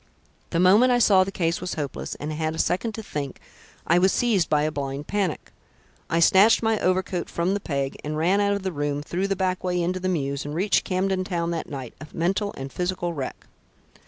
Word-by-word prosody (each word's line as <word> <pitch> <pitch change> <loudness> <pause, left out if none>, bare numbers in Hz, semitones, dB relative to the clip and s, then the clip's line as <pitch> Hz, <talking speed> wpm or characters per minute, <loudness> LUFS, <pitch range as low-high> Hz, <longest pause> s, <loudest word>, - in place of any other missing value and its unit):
The 170 - 0
moment 205 +8 +6
I 245 - +4
saw 200 -5 +5
the 195 - -5
case 170 -2 -1
was 180 0 -3
hopeless, 145 -3 -4
and 150 +1 -5
had 155 +1 -2
a - - -7
second 220 +7 0
to 220 - -6
think, 140 -8 -5 0.5
I 170 +2 +4
was 190 +1 +4
seized 215 -9 +1
with 150 0 +3
a - - -2
blind 140 0 -4
panic. 195 -5 -2 0.6
I 165 - +1
snatched 195 +7 +5
my 220 -1 +2
overcoat 185 -1 0
from 170 +3 0
the 205 - 0
peg 140 -6 -2
and 150 +1 -3
ran 180 +6 +2
out 200 0 +2
of 200 -1 -3
the 190 - -1
room; 145 -2 -2
through 180 +5 -2
the 195 - 0
back 185 -1 -1
way 180 -1 0
into 180 +2 -1
the 185 0 -1
mews, 140 -5 -1
and 145 +1 -5
reached 195 +4 +2
Camden 185 0 0
Town 170 -3 -2
that 170 - -4
night, 130 -4 -6
a 155 - -8
mental 190 +5 0
and 135 0 -7
physical 180 -1 -2
wreck." 140 -5 -6
180 Hz, 220 wpm, -24 LUFS, 155-190 Hz, 0.6 s, moment